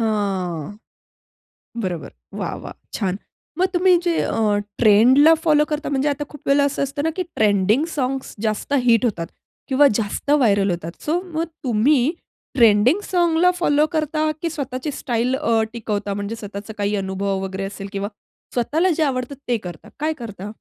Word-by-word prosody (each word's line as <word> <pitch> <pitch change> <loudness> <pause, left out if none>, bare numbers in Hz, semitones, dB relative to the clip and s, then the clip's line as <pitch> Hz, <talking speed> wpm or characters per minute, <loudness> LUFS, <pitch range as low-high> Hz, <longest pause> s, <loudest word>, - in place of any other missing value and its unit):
हां. 200 -5 -2 1.1
बरोबर. 175 -5 -4 0.3
वाह! - - -3
वाह! - - -8 0.2
छान. 195 -2 -1 0.4
मग 370 - +5
तुम्ही 365 +1 +5
जे 345 - +2
अ, - - -1 0.4
ट्रेंडला 250 +8 +6
फॉलो 300 -1 +5
करता, 300 0 -2
म्हणजे 275 +2 +1
आता 290 0 -2
खूप 295 - -11
वेळेला 280 0 +4
असं - - -3
असतं 280 +1 -2
ना - - +2
की 370 - 0 0.2
ट्रेंडिंग 210 +6 +3
साँग्स 265 -1 -2
जास्त 215 +5 -2
हिट 230 0 +4
होतात. 170 -6 -4 0.4
किंवा 280 +2 +5
जास्त 210 +6 -3
व्हायरल 200 -3 +3
होतात. 170 -1 -4
सो 335 +4 0
मग 330 -3 -3 0.2
तुम्ही 250 +4 +3 0.6
ट्रेंडिंग 230 - +5
साँगला 345 -1 +3
फॉलो 295 -2 +3
करता 310 0 0
की 335 - -1
स्वतःची 280 -2 -4
स्टाईल 245 +1 0
अ, 230 -6 +1
टिकवता? 210 -3 -3
म्हणजे 205 +3 -4
स्वतःच 200 +1 -7
काही 205 +1 0
अनुभव 190 0 -2
वगैरे 190 0 -4
असेल 200 -1 -7
किंवा 200 0 -3 0.5
स्वतःला 310 +9 +1
जे 320 - +1
आवडत 255 -2 -1 0.2
ते 240 - +2
करता. 175 -6 -9
काय 310 +1 +1
करता? 205 -3 -7
235 Hz, 160 wpm, -21 LUFS, 200-295 Hz, 1.1 s, ट्रेंडला